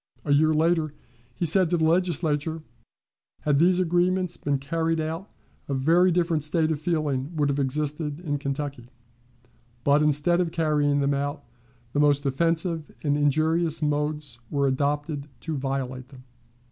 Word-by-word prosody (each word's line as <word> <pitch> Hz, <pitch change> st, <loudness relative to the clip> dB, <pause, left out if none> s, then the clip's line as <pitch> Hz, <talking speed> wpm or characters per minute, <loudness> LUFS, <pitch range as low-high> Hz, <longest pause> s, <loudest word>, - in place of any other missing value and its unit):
A 145 Hz, -, +2 dB
year 155 Hz, +2 st, +4 dB
later, 160 Hz, -1 st, +1 dB, 0.4 s
he 175 Hz, -, -1 dB
said 175 Hz, +2 st, +2 dB
to 175 Hz, -, +2 dB
the 160 Hz, -, +2 dB
Legislature: 160 Hz, -2 st, 0 dB, 0.8 s
"Had 145 Hz, -2 st, +2 dB
these 180 Hz, +2 st, +4 dB
agreements 180 Hz, 0 st, +1 dB
been 145 Hz, -1 st, -1 dB
carried 165 Hz, +4 st, -1 dB
out, 160 Hz, +5 st, -4 dB, 0.4 s
a 140 Hz, -, -1 dB
very 165 Hz, +7 st, +4 dB
different 165 Hz, -3 st, +1 dB
state 160 Hz, +1 st, +1 dB
of 150 Hz, -2 st, -2 dB
feeling 155 Hz, -3 st, -1 dB
would 145 Hz, -2 st, +1 dB
have 140 Hz, 0 st, 0 dB
existed 150 Hz, +2 st, -2 dB
in 145 Hz, -5 st, -3 dB
Kentucky. 140 Hz, -2 st, -4 dB, 1.0 s
But, 145 Hz, +1 st, +4 dB
instead 150 Hz, +4 st, +2 dB
of 170 Hz, -2 st, -1 dB
carrying 150 Hz, -3 st, +1 dB
them 140 Hz, 0 st, +1 dB
out, 145 Hz, +1 st, -3 dB, 0.5 s
the 145 Hz, -, +1 dB
most 145 Hz, -1 st, +3 dB
offensive 165 Hz, +2 st, 0 dB
and 145 Hz, -2 st, +1 dB
injurious 155 Hz, +3 st, +1 dB
modes 150 Hz, -3 st, -1 dB
were 140 Hz, -1 st, 0 dB
adopted 145 Hz, +2 st, -1 dB
to 160 Hz, -1 st, -3 dB
violate 130 Hz, -2 st, -3 dB
them." 130 Hz, -2 st, -14 dB
150 Hz, 150 wpm, -25 LUFS, 145-165 Hz, 1.0 s, year